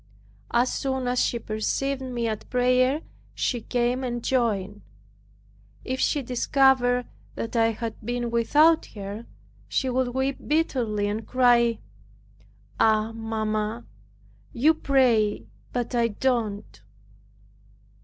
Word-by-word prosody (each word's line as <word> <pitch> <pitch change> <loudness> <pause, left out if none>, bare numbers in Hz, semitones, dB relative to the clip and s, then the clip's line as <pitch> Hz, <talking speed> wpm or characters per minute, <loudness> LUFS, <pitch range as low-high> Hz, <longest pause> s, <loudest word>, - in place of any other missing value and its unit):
As 245 +2 +2
soon 265 -2 -2
as 245 0 +1
she 235 - 0
perceived 235 +5 -2
me 245 -3 -3
at 215 -2 -5
prayer, 255 +3 +2 0.3
she 240 -3 -1
came 245 +2 -1
and 240 -2 -3
joined. 205 -6 0 1.0
If 260 +1 -3
she 290 - +1
discovered 250 0 +2 0.3
that 230 - -5
I 225 -1 +4
had 225 0 -5
been 240 +1 -2
without 300 +8 +4
her, 205 +3 -7 0.4
she 260 -2 -1
would 255 0 +1
weep 265 +1 -1
bitterly 245 -9 0
and 215 +2 -4
cry, 240 -2 +3 1.0
"Ah, 220 0 +3
mamma, 215 - -3 0.7
you 295 +7 +4
pray 250 -8 +2 0.3
but 245 0 -3
I 235 -1 +2
don't." 210 - -2
240 Hz, 115 wpm, -25 LUFS, 220-260 Hz, 1.0 s, I